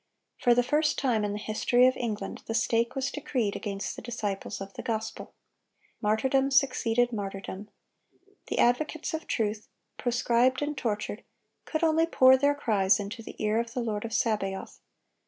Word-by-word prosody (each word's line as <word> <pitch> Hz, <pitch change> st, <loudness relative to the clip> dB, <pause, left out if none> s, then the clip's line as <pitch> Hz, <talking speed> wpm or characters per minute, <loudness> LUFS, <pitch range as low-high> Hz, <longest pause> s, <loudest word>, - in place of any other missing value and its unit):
For 240 Hz, -1 st, +4 dB
the 245 Hz, -, +4 dB
first 300 Hz, +5 st, +1 dB
time 240 Hz, -6 st, +1 dB
in 205 Hz, -, -1 dB
the 205 Hz, -, -3 dB
history 220 Hz, +4 st, +2 dB
of 255 Hz, 0 st, +4 dB
England, 220 Hz, -4 st, -4 dB
the 225 Hz, -, -2 dB
stake 230 Hz, +2 st, +1 dB
was 270 Hz, 0 st, -1 dB
decreed 250 Hz, -8 st, -2 dB
against 200 Hz, -2 st, -4 dB
the -, -, -8 dB
disciples 210 Hz, -4 st, -4 dB
of 195 Hz, 0 st, -8 dB
the -, -, -6 dB
gospel. 220 Hz, -1 st, -4 dB, 0.7 s
Martyrdom 265 Hz, +6 st, +2 dB
succeeded 245 Hz, -3 st, +2 dB
martyrdom. 200 Hz, 0 st, -5 dB, 0.8 s
The -, -, -3 dB
advocates 305 Hz, +7 st, +1 dB
of 320 Hz, -, -4 dB
truth, 215 Hz, -2 st, -1 dB, 0.3 s
proscribed 245 Hz, +2 st, +2 dB
and 295 Hz, 0 st, -2 dB
tortured, 210 Hz, -4 st, -3 dB, 0.4 s
could 315 Hz, +1 st, -2 dB
only 325 Hz, 0 st, +3 dB
pour 260 Hz, -5 st, +6 dB
their 285 Hz, +2 st, +2 dB
cries 205 Hz, -8 st, +2 dB
into 205 Hz, +4 st, -5 dB
the -, -, -10 dB
ear 215 Hz, +1 st, +1 dB
of 235 Hz, 0 st, -4 dB
the 250 Hz, -, 0 dB
Lord 215 Hz, -3 st, -2 dB
of 230 Hz, -, -5 dB
Sabaoth. 210 Hz, -4 st, -1 dB
230 Hz, 165 wpm, -28 LUFS, 210-260 Hz, 0.8 s, pour